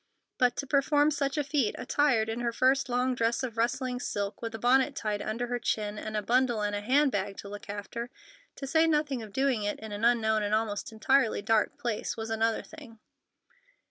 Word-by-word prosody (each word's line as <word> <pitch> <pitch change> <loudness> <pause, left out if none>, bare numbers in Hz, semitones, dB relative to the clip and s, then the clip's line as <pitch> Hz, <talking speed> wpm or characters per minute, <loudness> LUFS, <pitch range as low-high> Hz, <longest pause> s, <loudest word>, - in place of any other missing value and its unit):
But 250 -1 +3
to 280 - -3
perform 290 +2 +3
such 280 -1 -1
a 295 - +2
feat 275 -5 0
attired 250 -7 +2
in 225 +1 -3
her 240 -1 0
first 260 +3 +2
long 250 +1 +1
dress 235 +1 0
of 240 -3 -4
rustling 245 +2 -1
silk, 200 -3 -3
with 225 -1 -4
a - - -4
bonnet 260 +4 +3
tied 210 -4 -2
under 230 +3 -2
her 245 0 -3
chin, 210 -2 -2
and 215 0 -4
a 210 - -2
bundle 240 -1 +2
and 205 0 -1
hand 260 +8 +2
bag 200 -1 -2
to - - -8
look 205 0 -9
after—to 245 - -8
say 320 +4 +3
nothing 300 -5 +1
of 215 -2 -9
doing 265 -1 +1
it 205 0 -2
in 220 -1 -8
an 205 +1 -5
unknown 220 -2 +3
and 205 +1 +1
almost 215 -1 -2
entirely 225 0 +2
dark 220 0 +1
place—was 225 -1 -3
another 225 0 0
thing. 285 -8 -13
235 Hz, 200 wpm, -29 LUFS, 215-270 Hz, -, But